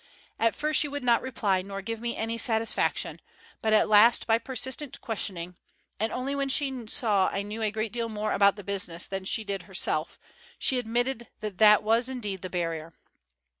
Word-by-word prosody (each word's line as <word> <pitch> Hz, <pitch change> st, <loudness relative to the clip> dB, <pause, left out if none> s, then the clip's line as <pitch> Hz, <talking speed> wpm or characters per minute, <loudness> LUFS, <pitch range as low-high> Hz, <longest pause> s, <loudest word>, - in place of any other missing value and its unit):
At 230 Hz, 0 st, +2 dB
first 305 Hz, 0 st, +2 dB
she 300 Hz, -, +1 dB
would 285 Hz, -1 st, -5 dB
not 235 Hz, -2 st, +4 dB
reply 205 Hz, -7 st, 0 dB
nor 195 Hz, +1 st, -7 dB
give 225 Hz, +2 st, -4 dB
me 235 Hz, 0 st, -3 dB
any 225 Hz, +1 st, -2 dB
satisfaction, 225 Hz, -2 st, 0 dB, 0.4 s
but 220 Hz, -, +1 dB
at 215 Hz, -, +5 dB
last 215 Hz, +3 st, +6 dB
by 225 Hz, 0 st, +3 dB
persistent 260 Hz, +2 st, -3 dB
questioning, 180 Hz, -7 st, -4 dB, 0.4 s
and 220 Hz, +2 st, 0 dB
only 260 Hz, +2 st, -2 dB
when 275 Hz, -1 st, -1 dB
she 265 Hz, -4 st, -1 dB
saw 210 Hz, -4 st, +2 dB
I 195 Hz, -, -2 dB
knew 210 Hz, +2 st, -6 dB
a 215 Hz, -, +2 dB
great 215 Hz, 0 st, -3 dB
deal 230 Hz, -1 st, -2 dB
more 215 Hz, 0 st, -2 dB
about 200 Hz, 0 st, +5 dB
the 205 Hz, -, -9 dB
business 190 Hz, -4 st, -1 dB
than 195 Hz, -1 st, -4 dB
she 220 Hz, +3 st, +1 dB
did 200 Hz, -2 st, -4 dB
herself, 165 Hz, -4 st, -1 dB, 0.4 s
she 260 Hz, -, +1 dB
admitted 240 Hz, +1 st, -1 dB
that 210 Hz, -3 st, -5 dB
that 210 Hz, -1 st, +7 dB
was 230 Hz, +4 st, +2 dB
indeed 210 Hz, -8 st, -4 dB
the 185 Hz, -, -5 dB
barrier. 165 Hz, -2 st, -3 dB
220 Hz, 190 wpm, -27 LUFS, 200-240 Hz, 0.4 s, that